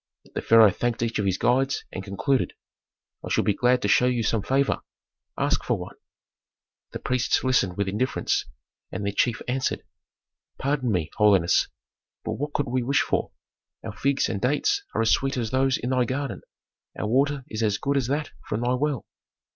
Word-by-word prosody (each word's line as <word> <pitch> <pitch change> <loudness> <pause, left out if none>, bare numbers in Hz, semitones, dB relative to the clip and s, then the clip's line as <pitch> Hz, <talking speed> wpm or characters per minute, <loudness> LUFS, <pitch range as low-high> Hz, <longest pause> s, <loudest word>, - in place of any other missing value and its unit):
The - - -2
pharaoh 110 -3 +6
thanked 120 +3 -1
each 115 -1 -1
of 100 - 0
his 95 -1 +1
guides, 135 +5 +1
and 95 - -5
concluded, 110 +8 0 0.7
"I - - -6
should - - +1
be 105 - +3
glad 125 +3 +2
to - - +2
show 125 +5 +4
you 120 -2 +1
some 110 0 +1
favor; 135 +6 +1 0.6
ask - - +1
for - - 0
one." - - -8 1.0
The - - -4
priests 125 -1 0
listened 115 -9 +1
with 100 -1 0
indifference, 110 +7 0 0.5
and 100 +2 -4
their 100 - -1
chief 115 +2 0
answered, 130 +1 -1 0.7
"Pardon 135 -3 0
me, 80 -5 -1
holiness, 100 -5 +4 0.6
but - - -2
what 145 +2 -4
could 145 - 0
we 125 +1 0
wish 140 +4 +2
for? - - -1 0.5
Our 110 - -5
figs 140 +5 +1
and 100 - -3
dates 150 - +1
are - - +2
as 110 - +3
sweet 135 0 +1
as 115 -3 -2
those 130 0 +2
in 125 - -3
thy 125 -1 +2
garden, 135 +3 -3 0.6
our - - -2
water 135 +4 +1
is 110 -5 -4
as 105 -2 +1
good 140 +1 -1
as 135 -4 +1
that 145 +3 -2 0.2
from 105 - -2
thy 120 +1 +1
well. 140 -1 -1
125 Hz, 185 wpm, -25 LUFS, 105-135 Hz, 1.0 s, pharaoh